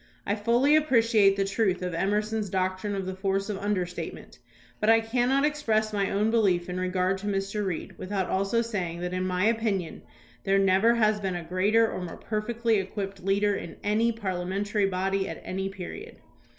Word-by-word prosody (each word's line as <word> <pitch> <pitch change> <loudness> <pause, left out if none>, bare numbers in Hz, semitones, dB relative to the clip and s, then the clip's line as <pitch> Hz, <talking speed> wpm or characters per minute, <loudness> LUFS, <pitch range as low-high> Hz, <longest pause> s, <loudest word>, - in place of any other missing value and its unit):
I 200 - 0
fully 240 +7 +3
appreciate 230 -9 +4
the 195 0 0
truth 195 -2 0
of 180 -1 -3
Emerson's 210 +3 -1
doctrine 185 +2 -1
of 195 -1 -3
the 190 - -3
force 195 +1 -1
of 195 - -4
understatement, 180 -5 -4 0.4
but 215 - +1
I 225 0 +7
cannot 245 +5 +1
express 220 -8 0
my 200 -1 0
own 210 +3 +1
belief 190 -7 +2
in 180 +1 -3
regard 185 +1 0
to 205 - -6
Mr. 195 +1 -1
Reed 190 0 -4
without 190 -1 -2
also 195 +5 +1
saying 180 -7 -3
that 180 0 -3
in 185 0 -1
my 185 +1 0
opinion 220 -7 0 0.4
there 195 0 +2
never 195 +4 +4
has 215 -2 +2
been 190 -3 -2
a 175 - -4
greater 200 +7 +2
or 185 - -5
more 175 -2 -6
perfectly 225 +1 -1
equipped 195 0 -5
leader 200 +2 +2
in 170 - -6
any 220 +3 +2
parliamentary 200 0 -1
body 195 +1 -1
at - - -6
any 190 +1 -3
period. 195 - -8
195 Hz, 180 wpm, -27 LUFS, 185-220 Hz, 0.4 s, I